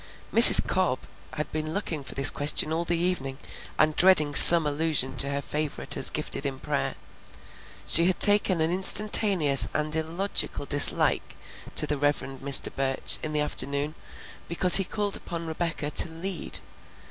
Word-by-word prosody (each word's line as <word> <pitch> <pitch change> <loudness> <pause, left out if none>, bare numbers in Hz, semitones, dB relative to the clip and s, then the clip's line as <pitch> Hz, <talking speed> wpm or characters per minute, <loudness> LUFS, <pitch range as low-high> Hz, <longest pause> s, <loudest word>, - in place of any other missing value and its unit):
Mrs. - - +8
Cobb - - -4 0.3
had 150 - -8
been 155 +1 -7
looking 165 -7 -7
for - - -11
this 135 0 +6
question 150 +2 -1
all 170 +1 -5
the 170 0 -3
evening 165 -7 -5 0.4
and 155 0 -1
dreading 170 -6 +2
some 165 +2 +10
allusion 145 -3 -4
to 140 +3 0
her 140 0 -6
favorite 150 -1 -4
as - - +5
gifted - - -6
in 135 -2 -6
prayer. - - -6 0.9
She 170 +2 +4
had 185 - -3
taken 205 -4 +1
an 160 +1 -3
instantaneous 190 -5 +1
and 155 0 -5
illogical 160 0 -5
dislike 145 0 -1 0.4
to - - 0
the 150 - -5
Rev. 145 0 -2 0.3
Mr. 140 -1 +2
Burch 135 -1 -5
in 155 - -8
the 150 -1 -3
afternoon 145 0 -5 0.5
because 175 +2 +4
he 195 - -2
called 205 +1 -5
upon 170 -1 -10
Rebecca 160 -2 -7
to 165 - -1
"lead." 170 +3 -5
155 Hz, 160 wpm, -22 LUFS, 145-175 Hz, 0.9 s, some